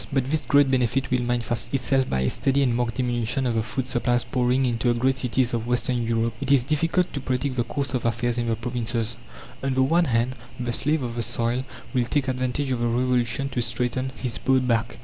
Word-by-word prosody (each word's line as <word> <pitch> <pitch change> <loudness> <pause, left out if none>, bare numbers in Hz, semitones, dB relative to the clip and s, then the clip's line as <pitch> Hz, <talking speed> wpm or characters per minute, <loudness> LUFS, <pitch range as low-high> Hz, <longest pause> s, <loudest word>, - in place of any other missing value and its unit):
But 135 -1 0
this 155 -1 0
great 140 -2 +4
benefit 130 0 +1
will 125 -1 +2
manifest 120 -3 -1
itself 135 0 +1
by 65 - 0
a 65 - +2
steady 140 0 +1
and 125 -3 +1
marked 120 -1 -1
diminution 125 +1 0
of 120 - +1
the 115 - +1
food 125 +3 -3
supplies 120 -1 +1
pouring 125 +1 +1
into 120 0 +1
the 120 - -1
great 130 +2 +2
cities 125 0 +1
of 115 0 -2
western 125 0 0
Europe. 115 0 0
It 140 0 -1
is 135 -3 +5
difficult 165 +6 0
to 140 - -2
predict 130 0 -2
the 120 - +1
course 140 +3 -3
of 125 - -1
affairs 120 +1 0
in 120 - -1
the 115 - +1
provinces. 115 -1 -2 0.5
On 135 -1 -1
the 130 - +4
one 170 +6 +3
hand 120 -1 0 0.2
the 120 -1 -2
slave 150 +3 +1
of 120 -1 -3
the 120 - -2
soil 120 +2 -1 0.3
will 125 -2 +2
take 140 +2 0
advantage 130 +2 -1
of 125 - 0
the 120 - +1
Revolution 125 +1 +1
to 125 - -2
straighten 125 +2 -1
his 125 -3 -3
bowed 130 -1 +2
back. 115 0 0
125 Hz, 230 wpm, -24 LUFS, 120-135 Hz, 0.5 s, is